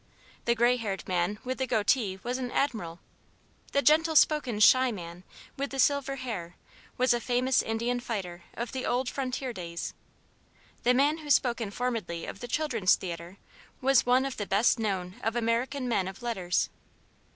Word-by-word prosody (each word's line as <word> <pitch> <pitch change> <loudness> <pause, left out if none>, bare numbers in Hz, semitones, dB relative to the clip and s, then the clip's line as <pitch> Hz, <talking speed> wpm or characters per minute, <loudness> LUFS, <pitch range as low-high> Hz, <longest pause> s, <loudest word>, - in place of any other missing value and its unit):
The 235 - +3
gray 240 +2 +3
haired 205 -5 -4
man 180 +3 0
with 255 0 -4
the 260 - 0
goatee 210 -3 +1
was 250 +2 -2
an 250 -1 -3
admiral. 215 - -2 0.7
The 280 - +2
gentle 320 +1 +4
spoken, 290 -8 +3
shy 255 +4 +6
man 175 -3 -8 0.3
with 280 +1 -2
the 270 - -6
silver 275 +1 +2
hair 215 -10 -5 0.4
was 255 -1 +4
a 240 - 0
famous 250 +2 +2
Indian 235 +2 -1
fighter 190 -8 -5
of 235 0 -4
the 260 -1 -4
old 250 +1 0
frontier 260 -1 -3
days. 170 -4 -5 0.9
The 250 +1 +3
man 290 +5 +3
who 300 -2 -9
spoke 245 -4 +3
informedly 210 -6 -3
of - - -7
the 245 - -6
Children's 240 -8 +2
Theatre 170 +1 -7 0.4
was 270 -1 +4
one 250 +2 +3
of 270 - -4
the 205 - -3
best 215 +4 +3
known 190 -4 -2
of 225 +1 -1
American 240 +3 0
men 200 -6 +1
of 195 +5 -8
letters. 190 -7 0
240 Hz, 170 wpm, -29 LUFS, 195-260 Hz, 0.9 s, shy